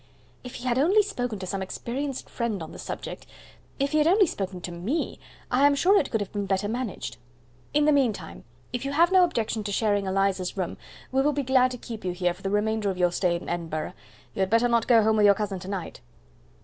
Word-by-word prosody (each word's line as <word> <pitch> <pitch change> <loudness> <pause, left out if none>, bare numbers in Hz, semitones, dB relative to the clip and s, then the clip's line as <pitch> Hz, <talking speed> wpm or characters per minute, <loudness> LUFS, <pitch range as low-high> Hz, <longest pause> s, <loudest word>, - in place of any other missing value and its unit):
"If 250 - -8
he 250 - -8
had 250 0 +1
only 385 +9 +5
spoken 245 - -3
to 190 - -6
some 195 +1 -3
experienced 260 +8 -4
friend 225 -7 -3
on 160 - -9
the - - -10
subject - - -6 0.5
if 275 0 0
he 310 - +3
had 300 - +4
only 390 +4 +5
spoken 190 - -4
to 175 - -6
ME 195 - -3 0.3
I 265 +3 +5
am 285 - +3
sure 365 +8 +4
it - - -2
could 220 - 0
have 200 - -4
been 205 -1 -3
better 195 +1 0
managed. 235 -1 -4 0.5
In 295 0 +3
the 305 - +5
meantime, 235 - 0 0.3
if 245 - -2
you 275 +1 -3
have 340 +4 +4
no 375 -1 +6
objection 225 -9 -1
to 205 - -4
sharing 205 -1 +1
Eliza's 190 -1 0
room, 185 -3 -3 0.3
we 265 +1 +2
will 295 +2 +2
be 285 0 -1
glad 255 0 +4
to 250 - -6
keep 225 -2 -8
you 180 -1 -2
here 180 -1 0
for - - -17
the 195 - -2
remainder 210 +1 0
of 190 - -3
your 180 -1 +3
stay 175 0 +1
in 170 - -6
Edinburgh. 165 -1 -3 0.4
You - - -8
had 190 -1 +2
better 230 +3 +4
not 235 -1 +2
go 230 -3 +6
home 220 0 +3
with 210 - +5
your 200 - +6
cousin 200 -2 -3
to 185 - -9
night." 195 -3 -5
220 Hz, 240 wpm, -26 LUFS, 190-265 Hz, 0.5 s, no